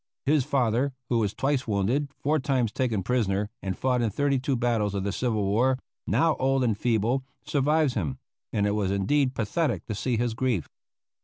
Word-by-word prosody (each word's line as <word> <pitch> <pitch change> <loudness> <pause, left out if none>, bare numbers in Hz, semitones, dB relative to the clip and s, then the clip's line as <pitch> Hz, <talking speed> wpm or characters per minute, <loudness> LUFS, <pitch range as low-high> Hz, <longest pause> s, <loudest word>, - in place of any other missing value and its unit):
His 145 0 +3
father, 130 -1 +1 0.2
who 120 - +2
was 105 -2 -1
twice 135 -2 0
wounded, 115 +8 0
four 155 +2 +1
times 130 -4 0
taken 115 -7 -1
prisoner, 105 -2 0
and 95 -2 -3
fought 125 -2 +1
in 115 - +1
thirty 140 +5 +1
two 130 +1 0
battles 115 -4 0
of 95 - -1
the 100 - -1
civil 110 -1 0
war, 125 +7 +2 0.3
now 165 -2 +3
old 135 0 +2
and 115 -4 +2
feeble, 120 +4 +1 0.2
survives 150 0 +2
him, 75 - -2 0.3
and 105 - +1
it 105 - +2
was 105 -2 0
indeed 130 +8 +1
pathetic 140 +9 -1
to 110 - -4
see 120 +4 -1
his 120 0 0
grief. 115 - -1
120 Hz, 185 wpm, -27 LUFS, 105-135 Hz, 0.3 s, His